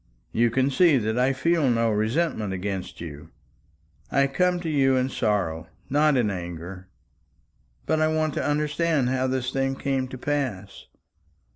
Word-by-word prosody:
You 120 +1 +2
can 130 +4 +1
see 165 0 +5
that 110 0 -1
I 130 +2 +3
feel 155 +1 +1
no 115 -1 +2
resentment 110 - 0
against 95 -1 -4
you. 75 -4 -8 0.8
I 140 0 +3
come 180 +6 +1
to 170 - -5
you 135 -4 +3
in 130 0 +1
sorrow, 90 -9 -1 0.2
not 150 0 +3
in 110 -5 +1
anger. 90 +1 -7 1.0
But 155 0 +1
I 155 - +4
want 155 -1 0
to - - -2
understand 150 -2 +1
how 130 0 0
this 130 -1 -1
thing 135 0 0
came 135 -1 -1
to 130 - -8
pass. 125 -9 -3
130 Hz, 155 wpm, -25 LUFS, 105-145 Hz, 1.0 s, see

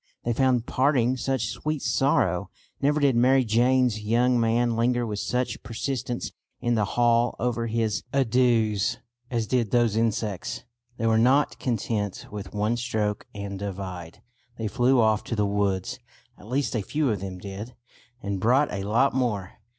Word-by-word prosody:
They 120 - 0
found 125 -1 +2
parting 130 -2 +2
such 130 -3 -1
sweet 145 +5 -3
sorrow. 95 -9 +1 0.3
Never 145 +2 +2
did 140 -4 +3
Mary 130 +2 +4
Jane's 120 0 +2
young 120 +3 +2
man 115 +1 +2
linger 120 +1 +1
with 105 -2 -3
such 125 +2 -2
persistence 120 +2 -3 0.3
in 120 - 0
the 110 -3 +2
hall 120 0 +3
over 120 -1 -1
his 110 -5 0
adieus 120 -5 +2 0.3
as 115 -3 -1
did 115 0 0
those 120 -2 +2
insects. 110 0 -1 0.3
They 115 - -2
were 110 0 +3
not 135 +5 +3
content 105 -4 -2
with 100 -2 -7
"one 105 +3 0
stroke 110 -4 -2
and 100 -1 -5
divide." 95 -4 -6 0.3
They 110 - -2
flew 125 +4 +3
off 110 -2 +3
to 115 - -3
the 105 -1 +1
woods 100 +1 -1 0.4
at 100 - -15
least 135 0 -1
a 110 - 0
few 145 +5 0
of 105 - -2
them 95 -1 -6
did 100 +5 -8 0.5
and 100 -1 -2
brought 125 +8 +3
a 100 -1 -3
lot 115 +7 +2
more. 110 -8 -2
115 Hz, 160 wpm, -26 LUFS, 105-125 Hz, 0.5 s, Mary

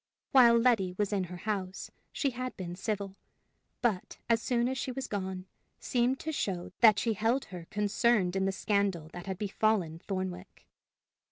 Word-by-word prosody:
While 240 -4 +7
Letty 225 -7 +3
was 205 0 0
in 195 -2 +1
her 180 0 -8
house, 190 -2 -4 0.2
she 275 - 0
had 255 +1 -5
been 175 -2 -5
civil, 200 0 -3 0.7
but, 210 -7 0
as 230 0 +3
soon 240 -1 +1
as 260 0 -2
she 255 - -2
was 265 +1 -4
gone, 190 -4 -4 0.3
seemed 250 +1 +1
to 315 - -3
show 185 - -2
that 215 -3 +7
she 230 - +1
held 225 +6 +1
her 175 -3 -9
concerned 210 -2 +2
in 190 0 +1
the 195 - +1
scandal 195 -5 0
that 175 +2 -9
had 190 -1 -3
befallen 200 -5 0
Thornwick. 185 -1 -5
200 Hz, 170 wpm, -30 LUFS, 185-235 Hz, 0.7 s, While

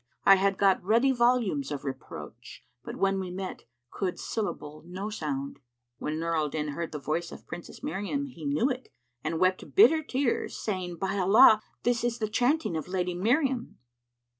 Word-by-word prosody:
I 195 - +8
had 195 0 +1
got 195 -2 +3
ready 230 +7 +4
volumes 235 - +2
of 145 -1 -5
reproach; 135 -1 -8
* - - -52
But - - -7
when 195 0 +1
we 185 -1 -4
met, 185 +1 -6 0.3
could 185 -3 -3
syllable 155 -8 -4
no 190 +4 -5
sound." 140 -7 -4 0.4
When 150 +1 -3
Nur 165 0 -1
al 155 -2 +1
Din 150 0 -3
heard 165 +3 -4
the 150 - -4
voice 160 +4 -2
of - - -11
Princess 175 - -9
Miriam, 205 - -2
he 250 - -11
knew 145 - +1
it 255 0 -6 0.3
and 160 +1 -2
wept 185 0 0
bitter 325 -6 +7
tears, 270 -4 -1
saying, 185 -4 -3
"By 195 +3 -2
Allah, 210 +3 +7 0.2
this 240 -1 +1
is 240 -1 0
the 215 -3 -2
chanting 250 - +1
of 155 - -3
the 180 - -12
Lady 180 -1 0
Miriam." 250 - 0
190 Hz, 185 wpm, -28 LUFS, 165-235 Hz, 0.4 s, I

